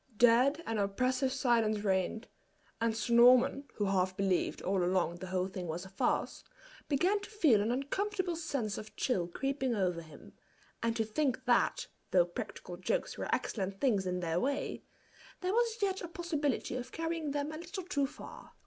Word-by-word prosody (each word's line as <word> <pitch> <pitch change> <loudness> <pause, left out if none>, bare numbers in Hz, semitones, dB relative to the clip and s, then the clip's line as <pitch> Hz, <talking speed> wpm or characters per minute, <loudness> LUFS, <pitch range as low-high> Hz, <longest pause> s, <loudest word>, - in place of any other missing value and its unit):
Dead 250 +7 +5
and 225 -2 -1
oppressive 255 +6 +1
silence 230 -5 +2
reigned; 195 +3 0 0.5
and 225 -1 +1
Sir 225 +2 -1
Norman, 250 +3 +6
who 205 - 0
half 185 -1 +1
believed 195 -2 +1
all 190 -1 +1
along 175 -1 +1
the 185 - -7
whole 185 0 0
thing 185 -2 -6
was 170 +3 -4
a - - -10
farce, 190 - -1 0.5
began 360 +8 +2
to 405 - -9
feel 310 - +4
an 215 - 0
uncomfortable 360 +8 -1
sense 275 -10 -2
of 215 - -10
chill 185 -10 0
creeping 265 +5 -1
over 180 -4 0
him, 155 -2 -14 0.5
and 230 0 0
to 225 -2 0
think 260 +3 -1
that, 240 -1 +2 0.2
though - - +5
practical - - -7
jokes - - -1
were - - -4
excellent 195 -2 -2
things 205 -9 +2
in 180 0 -1
their 165 0 0
way, 275 +5 -2 0.6
there 370 +1 0
was 465 0 +2
yet 385 -1 0
a 350 - -4
possibility 315 -7 -2
of 250 -1 -5
carrying 325 -2 -2
them 290 +1 -2
a 310 - -6
little 350 +3 -6
too 285 -6 0
far. - - -11
245 Hz, 175 wpm, -32 LUFS, 195-300 Hz, 0.6 s, Norman